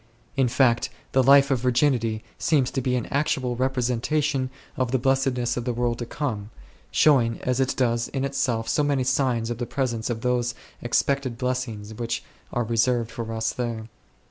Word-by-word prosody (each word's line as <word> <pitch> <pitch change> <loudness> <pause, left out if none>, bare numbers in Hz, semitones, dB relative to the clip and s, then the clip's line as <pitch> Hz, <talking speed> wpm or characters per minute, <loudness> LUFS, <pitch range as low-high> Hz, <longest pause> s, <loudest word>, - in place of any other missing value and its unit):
In 135 -2 +3
fact, 120 -1 +2 0.2
the 130 - +4
Life 140 +2 +6
of 130 - +2
Virginity 120 -3 +1 0.2
seems 140 -5 +2
to 135 - -1
be 125 0 0
an 125 - -1
actual 135 -4 0
representation 130 +2 0 0.3
of 130 -2 0
the 130 - +2
blessedness 130 -2 +1
in 120 - -2
the 125 0 -1
world 120 0 -1
to 120 - -4
come, 110 -8 -3 0.4
showing 120 -7 +3
as 125 0 0
it 135 -1 +1
does 120 -2 +1
in 135 0 -2
itself 125 -5 -1
so 115 +6 +2
many 145 -3 +1
signs 125 -3 +1
of 120 - -4
the 120 - -2
presence 120 -5 -2
of 115 -2 -3
those 120 -1 0 0.3
expected 130 0 0
blessings 125 -5 -3
which 115 +1 -3 0.3
are 120 - 0
reserved 115 +1 +1
for 115 -1 -5
us 110 0 -1
there. 115 -2 -4
125 Hz, 175 wpm, -25 LUFS, 115-135 Hz, 0.4 s, Life